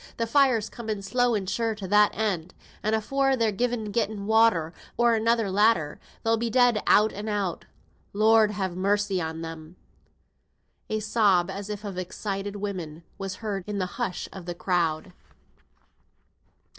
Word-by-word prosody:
Th' 230 - -1
fire's 250 -4 +3
coming 220 -4 -5
slow 245 +4 +1
and 195 -3 -2
sure 225 +2 -1
to 200 -2 -7
that 210 +2 +5
end, 185 -6 -2 0.3
and 215 +1 +1
afore 270 +5 +1
they've 225 -4 -1
either 240 -3 0
gotten 210 -1 -2
water, 220 -7 +3 0.2
or 235 0 +4
another 225 -2 +1
ladder, 195 -7 +2 0.2
they'll 225 0 +2
be 230 +1 -1
dead 245 -2 +3
out 215 +1 +5
and 210 +2 -5
out. 200 -5 -2 0.5
Lord 220 +1 +4
have 190 -4 -3
mercy 200 0 +1
on 160 0 -4
them!" 165 +1 -8 1.1
A 215 0 -1
sob, 205 -5 +2
as 200 +1 -6
if 210 0 -5
of 195 -3 -5
excited 195 +2 -4
women, 180 -6 -5 0.2
was 195 -1 -4
heard 200 -3 -2
in 210 -1 -3
the 185 - 0 0.2
hush 195 -7 -2
of 185 -2 -9
the 175 - -4
crowd. 175 -1 -1
205 Hz, 155 wpm, -26 LUFS, 185-225 Hz, 1.1 s, that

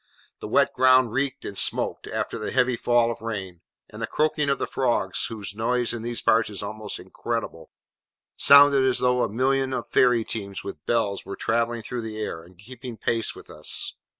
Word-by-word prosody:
The - - -6
wet - - +2
ground 130 -2 +4
reeked 135 +2 -2
and 100 - -6
smoked, - - +1
after - - -3
the 105 - -4
heavy 125 -1 +2
fall 120 0 +2
of 115 - -8
rain, 95 -6 -5 0.3
and - - -9
the - - -2
croaking 150 -1 0
of 140 - +1
the - - -2
frogs 120 -8 0
(whose 105 -4 -4
noise 120 +3 0
in 120 - -5
these 120 +1 -4
parts 110 -1 +3
is 105 -1 -6
almost 105 +1 -5
incredible) 95 -3 -5 0.7
sounded 140 -1 +7
as 130 -1 +2
though 125 0 +2
a - - 0
million 130 +4 0
of - - -4
fairy 125 -2 +4
teams 100 -4 -5
with 80 -6 -8
bells 110 -4 0
were 100 - -7
travelling 115 0 -1
through 120 +2 -5
the 110 -1 -6
air, 95 -6 -4
and 90 +2 -18
keeping 120 +3 -10
pace 115 0 -1
with - - -13
us. 75 0 0
115 Hz, 195 wpm, -25 LUFS, 105-125 Hz, 0.7 s, sounded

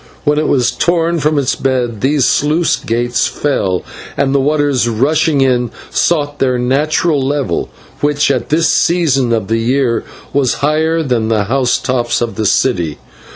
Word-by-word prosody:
When 150 0 +2
it 155 - 0
was 125 -3 +2
torn 170 -1 0
from 150 0 +1
its 135 -2 +1
bed 125 -5 -2
these 140 0 +2
sluice 155 +3 +1
gates 120 +1 -1
were 145 - +2
opened, 90 -6 -1 0.3
and 140 -1 +1
the 140 - +3
waters, 145 -3 +1
rushing 140 +5 +1
in, 125 -2 +1 0.2
sought 145 -4 0
their 130 -2 +1
natural 145 +4 +1
level, 140 0 -1 0.3
which 145 0 +1
at - - -2
this 165 +2 +2
season 145 -8 +2
of 110 -4 0
the 115 +1 0
year 120 0 0 0.3
was 135 -3 +1
higher 160 +2 +1
than 120 -6 0
the 110 -2 +1
housetops 125 +1 0
of 120 -1 -2
the 110 - -1
city. 85 - 0
135 Hz, 160 wpm, -14 LUFS, 120-150 Hz, 0.3 s, the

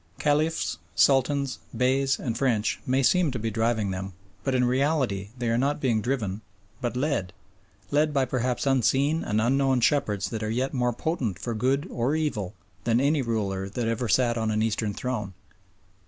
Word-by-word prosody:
Caliphs, 150 - 0 0.2
Sultans, 140 +1 +2 0.2
Beys, 135 +2 +2
and 115 -4 -2
French 115 -4 +1
may 130 +2 +2
seem 180 +4 +4
to 130 - -3
be 110 0 -2
driving 110 -2 0
them, 95 +1 -5 0.3
but 135 -1 0
in 125 - +3
reality 130 -6 0
they 120 -1 -2
are 115 +1 +2
not 140 +3 +1
being 120 -6 +1
driven 110 -5 -2 0.4
but 120 0 -2
led, 125 -10 -1 0.6
led 150 +1 +3
by 135 -2 +2
perhaps 125 0 -1
unseen 135 +4 +2
and 105 +1 0
unknown 135 +3 +2
shepherds 110 -7 +1
that 110 -1 -3
are 110 - -2
yet 125 +4 -1
more 125 -2 +1
potent 120 - -2
for 120 +4 -4
good 135 +8 0
or 125 +6 0
evil 110 - -2 0.3
than 115 0 +2
any 145 +2 +2
ruler 100 -5 -2
that 115 +3 -2
ever 115 +1 -1
sat 120 0 +2
on 110 -1 0
an 110 0 +1
Eastern 110 -1 0
throne. 105 -7 -3
125 Hz, 175 wpm, -26 LUFS, 110-135 Hz, 0.6 s, seem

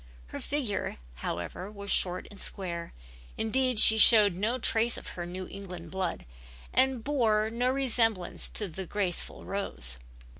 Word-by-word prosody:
Her - - -6
figure, 265 -9 -3 0.2
however, 85 - -5
was 200 -1 -5
short 180 -1 +1
and 200 - -12
square, 170 -4 -4 0.5
indeed 255 +1 +1
she 220 0 +9
showed 210 -3 +7
no 215 +8 -1
trace 230 -1 +2
of - - -8
her 175 -1 -6
New 185 +1 -6
England 180 -4 -9
blood 190 -2 -3 0.5
and 260 -3 +2
bore 220 -6 +1
no 245 +2 0
resemblance 230 -8 0
to 210 - -1 0.2
graceful 195 -3 -3
Rose. 65 - -4
205 Hz, 140 wpm, -29 LUFS, 180-230 Hz, 0.5 s, she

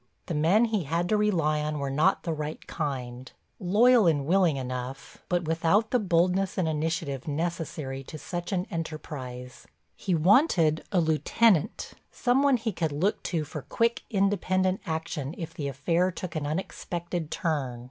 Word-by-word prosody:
The - - -4
men 170 +10 +4
he 215 -7 -1
had 170 +5 0
to 215 - +3
rely 170 -8 +2
on 150 0 -2
were 140 -1 -2
not 160 +8 +2
the 165 - -1
right 150 0 -5
kind, 130 -5 -4 0.3
loyal 215 +3 +5
and 145 -4 +2
willing 175 -3 +3
enough, 130 0 -6
but 175 -1 +1
without 165 +7 +2
the 250 - +3
boldness 185 0 +1
and 180 -4 +1
initiative 155 -3 -2
necessary 150 -3 -3
to 155 - -8
such 175 +4 -5
an 185 -2 0
enterprise. 130 -6 -6 0.3
He 185 -3 -1
wanted 165 - +4
a 185 - +3
lieutenant, 165 +3 +2 0.2
some 250 0 +1
one 280 -2 +4
he 225 -1 -2
could 165 -4 -2
look 175 +9 0
to 165 -4 0
for 150 0 -7
quick, 230 +8 0
independent 190 -2 +1
action 160 -2 -3
if 165 -1 -6
the 150 -5 -4
affair 165 +7 +1
took 180 -1 -6
an 150 -2 -2
unexpected 170 0 -4
turn. 140 -9 -2
165 Hz, 160 wpm, -27 LUFS, 150-185 Hz, 0.3 s, loyal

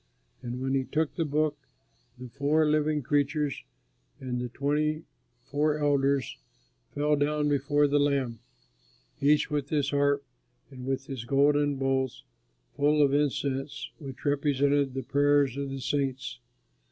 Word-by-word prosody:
And 120 +1 -5
when 135 +1 -1
he 135 -1 +2
took 155 +3 -1
the 165 - -1
book, 150 0 0 0.6
the 125 0 -8
four 145 +4 +2
living 150 -1 +1
creatures 145 +1 0 0.6
and 125 -2 -3
the 125 - -4
twenty 150 +4 -1 0.4
four 150 +3 0
elders 140 -3 +1 0.6
fell 150 +1 +2
down 150 +1 +1
before 145 +1 +2
the 145 0 +2
Lamb, 135 -5 0 0.8
each 150 +2 +3
with 145 -1 -1
his 145 -2 0
harp, 140 0 +2 0.5
and 130 -1 -9
with 135 0 -2
his 135 -4 -6
golden 145 +3 +3
bowls 135 -1 -1 0.5
full 150 +1 +3
of 140 -1 +2
incense 140 -1 -1
which 135 -3 -9
represent 140 -1 +1
the 135 - -2
prayers 145 -1 +2
of 140 0 -3
the 135 0 -5
saints. 135 -2 -2
140 Hz, 140 wpm, -28 LUFS, 135-145 Hz, 0.8 s, each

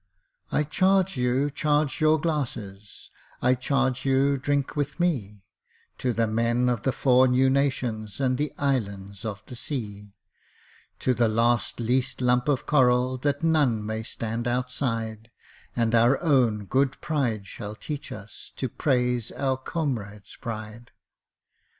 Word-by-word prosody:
I 150 - +2
charge 190 +4 +2
you 130 +3 +1
charge 150 0 0
your 155 0 +4
glasses 115 - -4 0.3
I 125 +1 +3
charge 130 0 0
you 135 +1 +3
drink 140 +1 -1
with 145 +2 -2
me 105 - -1 0.5
To 125 - 0
the 115 0 +1
men 115 +3 +1
of 120 -3 0
the 135 - +1
Four 130 0 +4
New 130 +1 +3
Nations, 125 -6 -1
And 130 -2 +2
the 150 0 -1
Islands 100 -7 -2
of 100 -3 -5
the 125 - -9
Sea 105 -8 -6 0.9
To 130 - +2
the 120 -1 +2
last 120 +2 +1
least 125 +2 0
lump 125 +2 +2
of 140 -4 +1
coral 130 -2 +3
That 145 +3 -1
none 145 -10 +2
may 110 +1 -3
stand 115 +1 -4
outside, 120 -3 -2 0.5
And 115 -1 +1
our 120 +4 +4
own 125 - +2
good 135 +5 +1
pride 120 -10 -1
shall 105 +2 -7
teach 145 +5 -6
us 105 0 -10
To 130 - -3
praise 125 -3 0
our 135 -1 0
comrade's 120 -8 -4
pride! 110 +1 -7
125 Hz, 140 wpm, -26 LUFS, 110-140 Hz, 0.9 s, your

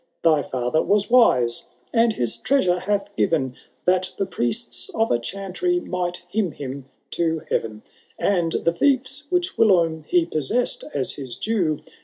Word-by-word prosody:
Thy 155 -3 +4
fiither 130 +3 0
was 205 +2 +1
wise, 125 - +4 0.3
and 230 -1 +4
his 120 - -1
treasure 185 -11 +2
hath 200 +1 -2
given. 135 -10 +1 0.3
That 185 0 +2
the 195 - 0
priests 120 -3 -3
of 225 0 +1
a 120 - +3
chantry 195 - -2
might 180 - -3
hymn 190 -2 -1
him 135 -1 -6 0.3
to 160 -2 0
heaTen; 110 -1 -2 0.3
And 175 -5 +1
the 170 - +1
fie& 260 +7 +3 0.3
which 360 +1 -1
whilome 165 -7 +3
he 175 -2 +3
possessed 170 - -1
as 135 -2 +1
his 130 -4 -6
due. 180 -9 0
175 Hz, 150 wpm, -23 LUFS, 140-205 Hz, 0.3 s, Thy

